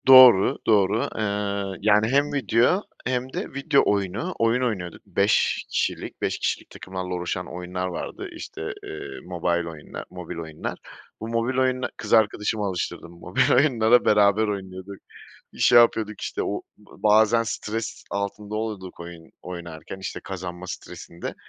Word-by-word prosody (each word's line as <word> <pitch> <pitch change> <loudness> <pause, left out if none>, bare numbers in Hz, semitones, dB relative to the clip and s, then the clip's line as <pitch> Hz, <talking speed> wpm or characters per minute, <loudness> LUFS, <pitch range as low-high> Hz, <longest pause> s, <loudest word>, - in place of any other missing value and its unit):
Doğru, 130 -7 +9
doğru. 105 0 +4 0.2
Eee, 100 -2 -2
yani 105 +1 +4
hem 140 +4 +2
video 125 - +3 0.2
hem 130 +1 -2
de - - -4
video 140 +1 +3
oyunu. 100 - -1
Oyun 115 +2 +3
oynuyorduk 95 -9 -3
5 100 +1 +2
kişilik, - - -2
5 - - -1
kişilik - - -2
takımlarla 95 -1 -6
oluşan 90 0 -4
oyunlar 90 +1 -3
vardı. 90 - -5
İşte, - - -8 0.2
eee, 80 - -7 0.2
mobile 85 -1 -1
oyunlar, 80 -2 -9
mobil 90 -2 -7
oyunlar. 80 -2 -5 0.4
Bu 110 - -5
mobil 115 +3 -1
oyuna, 130 0 +1
kız - - -3
arkadaşımı 105 -1 +2
alıştırdım 90 -3 -4
mobil 90 - +1
oyunlara 125 -4 +4
beraber 105 +1 +4
oynuyorduk. 95 -1 -5 0.6
Şey 120 - +7
yapıyorduk 110 -3 +2
işte, - - -2
o - - -2 0.2
bazen 110 +2 +3
stres 110 0 -4
altında 100 +1 -3
oluyorduk 105 -4 -5
oyun 85 -1 -10
oynarken, 85 -1 -8
işte 95 - -5
kazanma 90 -1 -6
stresinde. 85 -1 -7
100 Hz, 135 wpm, -24 LUFS, 90-115 Hz, 0.6 s, Doğru